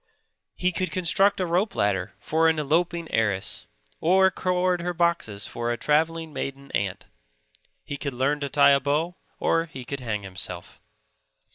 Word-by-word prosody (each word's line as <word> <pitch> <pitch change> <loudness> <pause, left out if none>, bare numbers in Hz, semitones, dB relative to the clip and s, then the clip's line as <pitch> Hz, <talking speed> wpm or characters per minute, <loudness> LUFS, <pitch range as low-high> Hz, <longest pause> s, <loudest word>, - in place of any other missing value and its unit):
He 180 0 +1
could 185 +1 -2
construct 195 +2 +2
a 185 - +1
rope 185 +4 0
ladder 100 -3 0
for 160 +1 +2
an 160 - +1
eloping 170 +3 0
heiress, 105 -4 0 0.3
or 190 +3 +4
cord 180 -1 0
her 175 0 -3
boxes 165 -12 0
for 120 0 -3
a 120 - -1
travelling 160 +2 0
maiden 135 +1 -5
aunt. 100 -2 -2 0.8
He 145 - -5
could 140 -2 -4
learn 140 +4 +1
to 140 -1 -3
tie 140 0 +6
a 140 - +5
bow, 150 +6 -1 0.2
or 165 0 +2
he 130 -6 -9
could 140 +2 -4
hang 110 -5 -3
himself. 90 -2 -6
150 Hz, 160 wpm, -25 LUFS, 125-175 Hz, 0.8 s, tie